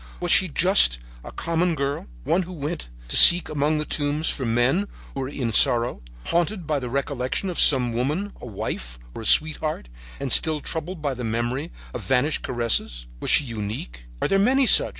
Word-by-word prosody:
Was 175 -1 -2
she 190 - +5
just 175 - +4 0.3
a - - -9
common 170 +1 -1
girl, 140 - -3 0.2
one 180 - +1
who 185 0 -8
went 155 - -6 0.2
to - - -4
seek 175 -1 +9
among 150 +1 0
the 150 - -2
tombs 150 +2 0
for 130 -4 -4
men 125 - +1 0.3
who - - -6
were 130 0 -4
in 125 -6 -4
sorrow, 120 - +2 0.2
haunted 175 +2 -1
by 150 -1 -1
the 125 -2 -6
recollection 140 +6 -3
of 175 - -5
some 125 -4 +3
woman, 150 - -2
a - - -8
wife 95 - -6 0.2
or - - -8
a - - -8
sweetheart, 155 - +1 0.3
and 135 -2 -4
still 155 -1 +3
troubled 160 +2 -5
by 140 -2 -1
the 125 -1 -7
memory 120 +7 -3 0.2
of - - -5
vanished 135 +4 0
caresses? 115 - -1
Was - - -4
she - - +4
unique? 100 - -7 0.2
Are - - +2
there 195 - +1
many 260 +6 +3
such? - - +6
145 Hz, 190 wpm, -23 LUFS, 120-165 Hz, 0.3 s, seek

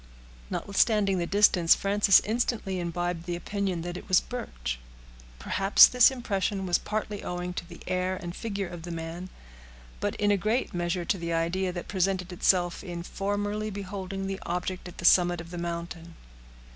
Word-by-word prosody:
Notwithstanding 200 -1 +1
the 170 - -1
distance, 185 -4 +5
Frances 200 0 +4
instantly 215 -4 -1
imbibed 175 0 -3
the 175 - -1
opinion 190 -1 -2
that 175 0 -5
it - - -10
was 185 - +5
Birch. 65 - -5 0.6
Perhaps 195 - +6
this 250 -1 +6
impression 200 -6 -2
was 175 -1 +2
partly 210 -1 -4
owing 180 0 -4
to 175 0 -6
the 170 - -12
air 185 0 -1
and 175 -1 -7
figure 200 -4 -3
of 175 -1 -8
the 175 - -8
man, 165 +2 -6 0.7
but - - -2
in 205 0 +2
a 200 - +3
great 220 +7 -1
measure 175 0 -1
to 190 - 0
the 170 0 -3
idea 175 +3 0
that 175 -1 -6
presented 185 -1 -1
itself 175 0 +1
on 175 -3 -6
formerly 205 +3 -2
beholding 195 -1 -5
the 195 0 -3
object 180 +1 -3
at 180 - -11
the 175 - -5
summit 175 -1 +5
of 170 0 -9
the 175 - -5
mountain. 170 0 -5
185 Hz, 170 wpm, -28 LUFS, 175-200 Hz, 0.7 s, Perhaps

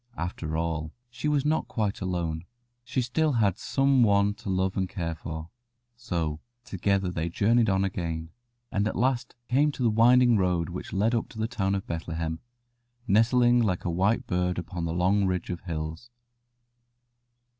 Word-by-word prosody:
After 80 -2 -3
all, 80 -1 -2 0.2
she 120 +5 -4
was 145 -2 +1
not 155 +1 +1
quite 105 -5 -2
alone; 85 -3 -2 0.4
she 130 +1 -1
still 150 +5 +1
had 105 -6 +2
some 135 -1 +2
one 100 -2 +4
to 100 - -8
love 95 0 0
and 95 -1 -1
care 85 -3 -3
for. 80 +1 -7 0.4
So 85 -11 -3 0.3
together 95 -2 0
they 85 -1 -2
journeyed 115 +5 +3
on 95 0 +2
again, 85 -3 -3 0.4
and 105 0 +1
at - - -3
last 125 0 0
came 145 +4 +3
to 130 - -3
the 115 - +3
winding 120 +1 +5
road 90 -3 +1
which 90 +1 -6
led 105 +5 +1
up 115 - 0
to - - -13
the 110 0 0
town 100 -5 -1
of 95 - -3
Bethlehem, 80 -1 -3 0.7
nestling 120 +3 +4
like 95 -6 0
a 85 - 0
white 95 +6 +1
bird 90 0 0
upon 85 -1 -4
the 80 - -2
long 95 +3 +2
ridge 90 -1 -2
of 90 - -4
hills. 80 +5 -5
95 Hz, 170 wpm, -27 LUFS, 85-115 Hz, 0.7 s, winding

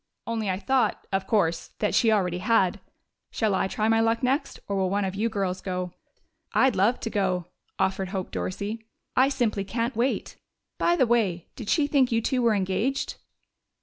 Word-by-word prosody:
"Only 225 -3 -2
I 185 - 0
thought, 260 +5 +1
of 195 0 0
course, 170 -7 0
that 210 - 0
she 225 - +4
already 180 -4 +1
had.... 190 -2 +2 0.5
Shall 220 -3 0
I 190 - +1
try 215 +2 -1
my 225 0 +4
luck 225 +2 +1
next, 265 +4 0
or 200 - -2
will 190 -1 +1
one 200 +1 0
of 190 - -2
you 215 +4 0
girls 195 -4 -2
go?" 180 -2 -3 0.6
"I'd 265 0 +4
love 210 +6 +3
to 225 - -3
go," 185 -4 0 0.3
offered 190 0 0
Hope 190 -1 -4
Dorsey. 200 - -4 0.3
"I 260 +2 +5
simply 235 -7 0
can't 230 +5 -2
wait. 240 +4 -1 0.4
By 345 - +3
the 265 - +4
way, 205 -8 +1
did 225 -4 -7
she 305 -4 +3
think 275 -3 +2
you 225 - +3
two 250 +3 0
were 230 -2 +3
engaged?" 200 +8 -1
210 Hz, 185 wpm, -26 LUFS, 190-235 Hz, 0.6 s, I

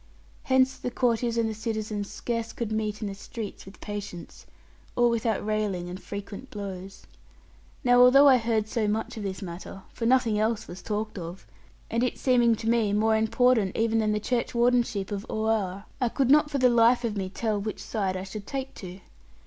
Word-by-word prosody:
Hence 260 0 +3
the - - -3
courtiers 235 -1 0
and 230 -1 +2
the 220 - -2
citizens 215 -2 -3
scarce 230 -1 -3
could 230 -3 -4
meet 215 0 -2
in - - -2
the 200 - -4
streets 205 0 -8
with 195 - -13
patience, 205 -4 -7 0.5
or 240 0 +4
without 225 -3 0
railing 210 -5 -1
and 185 - -7
frequent 200 +5 -7
blows. 195 -2 -7 0.8
Now 245 -1 +5
although 275 +3 +8
I 265 -2 +7
heard 225 -2 0
so 220 -1 -1
much 220 +3 -2
of 220 - -6
this 195 0 -4
matter, 185 +2 -8
for 230 - -2
nothing 235 -4 +3
else 220 0 0
was 175 +2 -9
talked 215 -1 -3
of, 170 +2 -8 0.5
and 230 - +1
it 250 - 0
seeming 240 -3 +3
to 225 - -6
me 225 -3 +2
more 220 +1 +3
important 220 -2 +2
even 225 0 +2
than 215 -1 +1
the 210 - 0
churchwardenship 235 -3 +1
of 200 -1 -3
Oare, 215 -3 -1 0.2
I 245 - +2
could 265 +2 +1
not 295 0 +5
for 285 - -1
the 255 -2 +5
life 240 +1 +4
of 225 -3 -1
me 190 -2 -3
tell 210 +1 -1
which 215 0 -4
side 195 -4 -2
I 185 - -5
should 200 +1 -8
take 270 -1 -4
to. 185 0 -9
220 Hz, 195 wpm, -27 LUFS, 205-235 Hz, 0.8 s, although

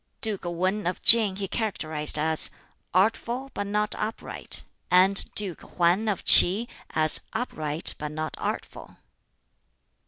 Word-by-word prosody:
Duke 210 -5 -3
Wan 185 +3 -3
of 180 - -4
Tsin 215 -4 +6
he 200 -1 -5
characterized 160 -10 0
as 160 +1 +3 0.4
"artful 235 +7 -1
but 205 - -5
not 210 +1 -2
upright"; 220 +1 -2 0.3
and 190 +2 +5
Duke 195 -5 -3
Hwan 180 +5 -1
of 200 - -4
Ts'i 205 +7 +6 0.2
as 155 -1 +1
"upright 155 -9 -1
but 150 0 -6
not 155 +1 -6
artful." - - -7
190 Hz, 125 wpm, -24 LUFS, 160-210 Hz, 0.4 s, Tsin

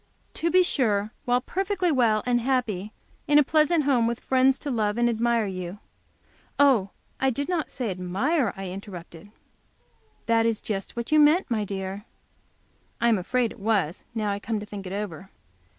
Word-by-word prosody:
"To 335 - 0
be 365 +1 +5
sure, 215 - 0
while 245 0 +2
perfectly 385 +3 -1
well 230 -6 +2
and 245 -1 +2
happy, 225 -6 -1 0.4
in 295 0 +5
a 295 - +7
pleasant 310 +2 +3
home; 255 -5 +2
with 235 0 -2
friends 265 0 +3
to 290 - -5
love 215 -2 0
and 240 0 +3
admire 235 -1 +1
you 185 -1 -5 0.4
" - - -34
"Oh, 220 -8 +2 0.3
I 265 - +2
did 280 +3 -2
not 350 -4 -1
say 240 -6 -3
admire," 200 - 0
I 195 -1 -5
interrupted. 185 -2 -9 1.0
"That 230 0 +3
was 225 -2 0
just 195 -3 -5
what 235 +4 -5
you 310 - +5
meant, 300 +1 +4
my 220 -2 +1
dear." 195 +1 -5 0.9
I 235 - +3
am 220 -4 +3
afraid 235 +5 0
it - - -12
was, 195 -6 0
now 215 -2 -1
I 200 - -2
come 220 +1 -3
to 205 - -7
think 200 -2 -8
it - - -7
over. 195 -2 -5
230 Hz, 180 wpm, -25 LUFS, 200-265 Hz, 1.0 s, a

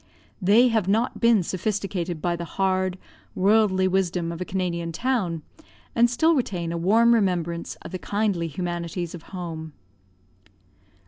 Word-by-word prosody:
They 220 +7 +5
have 220 -5 +1
not 220 +5 +1
been 230 -5 +4
sophisticated 185 -3 -3
by 175 -1 +1
the 170 - -5
hard, 185 -1 +1 0.4
worldly 195 -1 +3
wisdom 180 -2 0
of 170 +1 -7
a - - -2
Canadian 170 -3 -2
town, 180 - -1 0.5
and 240 +1 +4
still 315 +8 +3
retain 190 - -1
a - - -3
warm 225 +7 +4
remembrance 175 -6 0
of - - -8
the 185 - -4
kindly 200 -5 -1
humanities 175 +1 -4
of 175 - -8
home. 165 -4 -6
185 Hz, 140 wpm, -24 LUFS, 170-215 Hz, 0.5 s, They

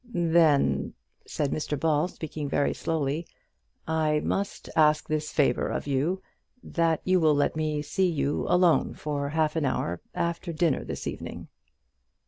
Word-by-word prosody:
"Then," 165 -4 +3 0.3
said 145 -2 -1
Mr 150 -2 -2
Ball, 155 +1 +2
speaking 155 -4 -6
very 145 0 +1
slowly, 160 0 -2 0.6
"I 155 -1 +1
must 200 0 -2
ask 150 -1 +4
this 155 0 -2
favour 135 -5 +2
of - - -3
you, 145 +7 0 0.4
that 165 -2 0
you 185 0 +3
will 155 -3 +4
let 145 +1 +1
me 155 -1 -1
see 185 +5 +1
you 145 -3 -1
alone 180 -2 +3
for 145 -2 -3
half 155 0 0
an 160 - 0
hour 90 -10 -1
after 170 +1 -2
dinner 160 -1 +1
this - - -6
evening." - - -6
155 Hz, 145 wpm, -27 LUFS, 145-165 Hz, 0.6 s, ask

